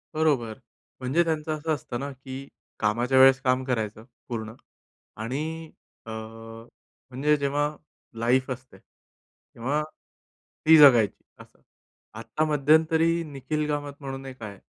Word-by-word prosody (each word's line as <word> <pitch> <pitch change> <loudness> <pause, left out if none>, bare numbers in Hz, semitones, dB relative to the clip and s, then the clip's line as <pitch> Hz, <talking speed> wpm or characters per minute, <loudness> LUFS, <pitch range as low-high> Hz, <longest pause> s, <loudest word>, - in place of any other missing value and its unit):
बरोबर. 135 -9 +1 0.4
म्हणजे 135 +7 +2
त्यांचं 160 -2 -2
असं 160 +1 -1
असतं 125 -4 -5
ना, 140 +1 -4
की 135 0 -9 0.3
कामाच्या 120 +5 +1
वेळेस 135 0 +7
काम 130 -1 +1
करायचं 110 -4 -2 0.2
पूर्ण 110 -2 -5 0.7
आणि 155 +7 -4 0.3
अ, - - -9
म्हणजे 115 +5 -4
जेव्हा 145 +1 0 0.5
लाईफ 125 +3 +2
असते, 130 0 -8
तेव्हा 135 +6 -7 0.8
ती 160 +1 +8
जगायची, 125 -8 +6 0.2
असं. - - -16 0.6
आता 155 - -1
मध्यंतरी 160 +3 +3
निखिल 150 +1 -3
कामत 145 -1 -3
म्हणून 135 -1 -6
एक 130 -2 -10
आहे. 100 -3 -8
135 Hz, 120 wpm, -26 LUFS, 120-150 Hz, 0.8 s, ती